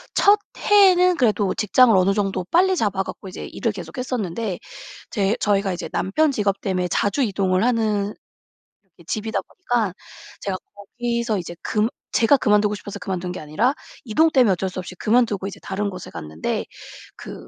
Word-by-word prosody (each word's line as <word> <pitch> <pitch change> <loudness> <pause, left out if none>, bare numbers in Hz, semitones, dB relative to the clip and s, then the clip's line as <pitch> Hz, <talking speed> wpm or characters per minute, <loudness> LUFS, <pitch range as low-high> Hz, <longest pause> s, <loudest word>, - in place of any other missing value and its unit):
첫 410 +1 +5 0.2
해에는 365 -3 +5
그래도 215 - +2
직장을 225 +2 +4
어느 190 +1 +4
정도 195 -2 -1
빨리 370 - +3
잡아 200 - 0
갖고 195 - -9
이제 185 - -7
일을 230 - -2
계속 170 -5 -9
했었는데 220 -6 -3 0.5
제 200 0 +1
저희가 200 -2 +1
이제 175 - -5
남편 290 +12 +1
직업 205 -5 -1
때문에 185 -2 -1
자주 205 +9 0
이동을 195 -5 +1
하는 215 -4 +1 0.8
이 170 - -18
집이다 220 +5 -2
보니까 240 - -2 0.5
제가 195 -2 -2 0.2
거기서 235 +2 -2
이제 175 -1 -7
금 215 0 +1 0.2
제가 235 +5 +4
그만두고 210 -3 +2
싶어서 205 0 -8
그만둔 180 -1 -4
게 180 - -6
아니라 155 - 0 0.3
이동 295 +8 +3
때문에 255 -8 +4
어쩔 190 +1 -2
수 185 - -6
없이 180 0 -7
그만두고 210 -2 +1
이제 200 - -8
다른 200 +1 -2
곳에 185 -2 -8
갔는데 80 -1 -4 0.5
그 - - -10
205 Hz, 360 characters per minute, -22 LUFS, 190-240 Hz, 0.8 s, 첫